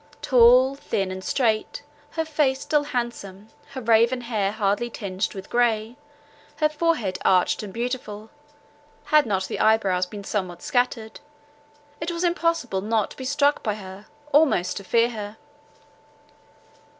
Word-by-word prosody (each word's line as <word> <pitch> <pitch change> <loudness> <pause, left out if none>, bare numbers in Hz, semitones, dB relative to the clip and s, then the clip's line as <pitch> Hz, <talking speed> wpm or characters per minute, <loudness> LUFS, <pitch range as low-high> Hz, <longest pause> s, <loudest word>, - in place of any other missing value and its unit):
Tall, 250 +1 +6
thin, 195 -8 -3
and 190 0 -6
strait, 220 -3 0 0.3
her 320 -1 -1
face 295 -4 0
still 295 -1 +1
handsome, 225 -6 -5 0.3
her 260 - -4
raven 230 +2 +3
hair 215 -5 -1
hardly 210 +2 0
tinged 195 -3 -4
with 190 -1 -8
grey, 230 -1 0 0.6
her 305 - +2
forehead 300 - -1
arched 185 -1 +3
and 210 -2 -7
beautiful, 230 -2 -5 0.7
had 300 -4 +3
not 190 -3 0
the - - -5
eye 220 0 +5
brows 185 -4 -1
been 205 +1 -9
somewhat 185 -4 -4
scattered—it 295 +6 -5
was 340 +1 -3
impossible 335 - 0
not 215 0 0
to - - -12
be 260 - -6
struck 285 +1 +2
by 210 -2 -2
her, 195 0 -11 0.2
almost 275 - +3
to 200 - -6
fear 230 +4 +2
her. 210 -1 -7
230 Hz, 140 wpm, -24 LUFS, 205-280 Hz, 0.7 s, Tall